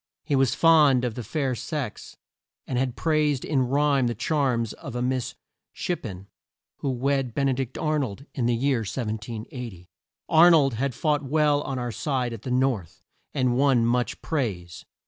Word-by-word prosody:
He 145 Hz, -, 0 dB
was 135 Hz, -2 st, +2 dB
fond 150 Hz, -6 st, +5 dB
of 120 Hz, -, -2 dB
the 120 Hz, -, -6 dB
fair 135 Hz, +3 st, -1 dB
sex 130 Hz, -2 st, -5 dB, 0.5 s
and 130 Hz, -, -4 dB
had 130 Hz, -2 st, -1 dB
praised 150 Hz, -4 st, +1 dB
in 130 Hz, -4 st, +1 dB
rhyme 140 Hz, -1 st, +2 dB
the 120 Hz, -, -2 dB
charms 125 Hz, -3 st, 0 dB
of 135 Hz, -, -9 dB
a 120 Hz, -, -2 dB
Miss 130 Hz, -1 st, -2 dB, 0.4 s
Ship 175 Hz, -, -3 dB
pen 95 Hz, -3 st, -7 dB, 0.5 s
who 140 Hz, -, -3 dB
wed 130 Hz, -1 st, -1 dB
Ben 140 Hz, -1 st, +1 dB
e -, -, +2 dB
dict 130 Hz, -1 st, -4 dB
Ar 155 Hz, -1 st, 0 dB
nold 130 Hz, 0 st, -4 dB
in 120 Hz, -4 st, 0 dB
the 120 Hz, -, +2 dB
year 130 Hz, +1 st, +1 dB
1780. 110 Hz, -2 st, -5 dB, 0.4 s
Ar 165 Hz, +2 st, +7 dB
nold 145 Hz, -6 st, +4 dB
had 130 Hz, +3 st, -2 dB
fought 150 Hz, -2 st, +1 dB
well 145 Hz, +1 st, +2 dB
on 135 Hz, -2 st, -4 dB
our 120 Hz, -1 st, -3 dB
side 125 Hz, -1 st, -2 dB
at 115 Hz, -, -8 dB
the 130 Hz, -, -6 dB
north, 125 Hz, -9 st, -1 dB, 0.3 s
and 125 Hz, -3 st, +2 dB
won 130 Hz, -3 st, +3 dB
much 120 Hz, +1 st, 0 dB
praise. 95 Hz, -, -3 dB
130 Hz, 180 wpm, -25 LUFS, 120-145 Hz, 0.5 s, Ar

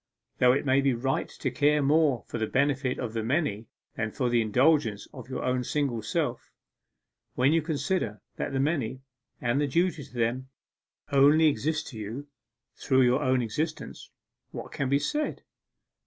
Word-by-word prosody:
Though 125 Hz, 0 st, +6 dB
it 140 Hz, -, -1 dB
may 135 Hz, 0 st, +3 dB
be 135 Hz, -2 st, +2 dB
right 135 Hz, +3 st, -1 dB
to 135 Hz, -, -4 dB
care 145 Hz, +3 st, +2 dB
more 145 Hz, -3 st, +3 dB
for 115 Hz, -, -5 dB
the 110 Hz, -, 0 dB
benefit 135 Hz, 0 st, 0 dB
of 115 Hz, -3 st, -4 dB
the 115 Hz, -, -1 dB
many 115 Hz, -3 st, -1 dB, 0.3 s
than 110 Hz, -1 st, -2 dB
for 125 Hz, +3 st, -1 dB
the 120 Hz, -1 st, +3 dB
indulgence 115 Hz, -1 st, +2 dB
of 130 Hz, -2 st, -10 dB
your 130 Hz, -, -4 dB
own 125 Hz, 0 st, 0 dB
single 135 Hz, -4 st, -1 dB
self, 105 Hz, -, -2 dB, 0.9 s
when 135 Hz, +4 st, +3 dB
you 165 Hz, -, +3 dB
consider 145 Hz, -, -2 dB, 0.2 s
that -, -, -3 dB
the 135 Hz, -, -1 dB
many, 135 Hz, -4 st, -1 dB, 0.4 s
and 125 Hz, +2 st, 0 dB
duty 170 Hz, +1 st, +1 dB
to -, -, -15 dB
them, 125 Hz, +2 st, -1 dB, 0.6 s
only 145 Hz, +3 st, +5 dB
exist 155 Hz, +1 st, +1 dB
to 115 Hz, -, -9 dB
you 115 Hz, +7 st, -6 dB, 0.5 s
through 130 Hz, -1 st, +2 dB
your 125 Hz, +3 st, +3 dB
own 130 Hz, -2 st, +2 dB
existence, 155 Hz, +8 st, -4 dB, 0.4 s
what -, -, -8 dB
can 135 Hz, -2 st, -2 dB
be 140 Hz, -, +4 dB
said? 295 Hz, -, -2 dB
130 Hz, 170 wpm, -27 LUFS, 120-145 Hz, 0.9 s, Though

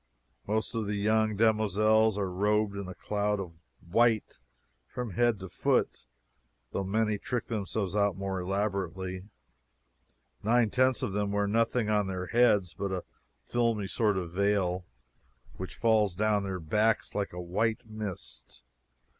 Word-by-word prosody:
Most 110 Hz, +3 st, -1 dB
of 115 Hz, -3 st, -2 dB
the 105 Hz, -, -1 dB
young 110 Hz, +1 st, +2 dB
demoiselles 110 Hz, 0 st, +3 dB
are 100 Hz, -2 st, 0 dB
robed 105 Hz, +2 st, +1 dB
in 100 Hz, -2 st, -5 dB
a 90 Hz, -, -7 dB
cloud 105 Hz, 0 st, -1 dB
of 90 Hz, -3 st, -5 dB, 0.4 s
white 115 Hz, +4 st, +2 dB, 0.5 s
from 125 Hz, -3 st, -5 dB
head 120 Hz, +3 st, +2 dB
to 95 Hz, -, -6 dB
foot, 80 Hz, -, 0 dB, 0.7 s
though 100 Hz, -, -2 dB
many 105 Hz, +1 st, 0 dB
trick 120 Hz, +1 st, -3 dB
themselves 105 Hz, -3 st, -3 dB
out 100 Hz, -2 st, +2 dB
more 95 Hz, -1 st, -2 dB
elaborately. 95 Hz, -1 st, -2 dB, 1.2 s
Nine 115 Hz, 0 st, +3 dB
tenths 130 Hz, 0 st, +2 dB
of 110 Hz, -7 st, -2 dB
them 100 Hz, 0 st, 0 dB
wear 100 Hz, 0 st, +1 dB
nothing 115 Hz, +1 st, +1 dB
on 105 Hz, -2 st, +2 dB
their 90 Hz, -1 st, -3 dB
heads 105 Hz, -5 st, +3 dB
but 100 Hz, -1 st, -3 dB
a 95 Hz, -2 st, -2 dB, 0.4 s
filmy 115 Hz, -4 st, 0 dB
sort 105 Hz, 0 st, +1 dB
of 90 Hz, -3 st, -3 dB
veil, 95 Hz, -1 st, +1 dB, 0.7 s
which 95 Hz, -, -6 dB
falls 110 Hz, -5 st, +2 dB
down 105 Hz, +1 st, +2 dB
their 95 Hz, -2 st, -3 dB
backs 105 Hz, +7 st, +1 dB
like 100 Hz, -1 st, -2 dB
a 90 Hz, -, -7 dB
white 105 Hz, +7 st, -1 dB
mist. 90 Hz, -, -8 dB
105 Hz, 145 wpm, -29 LUFS, 95-110 Hz, 1.2 s, demoiselles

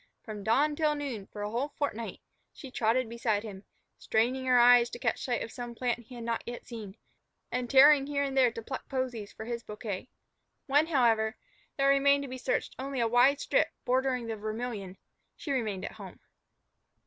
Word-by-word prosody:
From 210 Hz, -2 st, -7 dB
dawn 285 Hz, +8 st, +2 dB
till 300 Hz, -1 st, +1 dB
noon, 260 Hz, -9 st, -5 dB
for 205 Hz, -, -7 dB
a 210 Hz, -, -3 dB
whole 245 Hz, +5 st, -1 dB
fortnight, 230 Hz, -6 st, -3 dB, 0.3 s
she 270 Hz, -4 st, -11 dB
trotted 235 Hz, +1 st, +1 dB
beside 225 Hz, -2 st, -1 dB
him, 200 Hz, -3 st, -9 dB, 0.3 s
straining 250 Hz, +4 st, 0 dB
her 250 Hz, -1 st, +5 dB
eyes 240 Hz, 0 st, +7 dB
to -, -, -7 dB
catch 225 Hz, -4 st, -1 dB
sight 245 Hz, -2 st, -1 dB
of 225 Hz, -, -8 dB
some 240 Hz, -1 st, -7 dB
plant 245 Hz, 0 st, -1 dB
he 255 Hz, -, -11 dB
had 235 Hz, -, -7 dB
not 230 Hz, 0 st, -1 dB
yet 240 Hz, 0 st, -6 dB
seen, 220 Hz, -4 st, -8 dB, 0.5 s
and 250 Hz, -1 st, -2 dB
tearing 275 Hz, +1 st, +7 dB
here 285 Hz, -1 st, 0 dB
and 275 Hz, -1 st, -3 dB
there 255 Hz, -3 st, +5 dB
to 230 Hz, 0 st, -7 dB
pluck 265 Hz, -, -6 dB
posies 250 Hz, -6 st, -3 dB
for 220 Hz, -, -9 dB
his 235 Hz, 0 st, -4 dB
bouquet. 210 Hz, 0 st, -6 dB, 0.6 s
When, 290 Hz, +2 st, +3 dB
however, 230 Hz, -7 st, +2 dB, 0.4 s
there 275 Hz, 0 st, +3 dB
remained 280 Hz, +1 st, +4 dB
to -, -, -5 dB
be 255 Hz, 0 st, -6 dB
searched -, -, -1 dB
only 270 Hz, 0 st, -3 dB
a 230 Hz, -, +2 dB
wide 245 Hz, +5 st, +4 dB
strip -, -, +2 dB, 0.2 s
bordering 255 Hz, -1 st, +1 dB
the 225 Hz, -1 st, -3 dB
Vermillion, 215 Hz, -3 st, -5 dB, 0.4 s
she 290 Hz, -, -6 dB
remained 220 Hz, -8 st, -1 dB
at -, -, -5 dB
home. -, -, -11 dB
245 Hz, 195 wpm, -30 LUFS, 225-270 Hz, 0.6 s, eyes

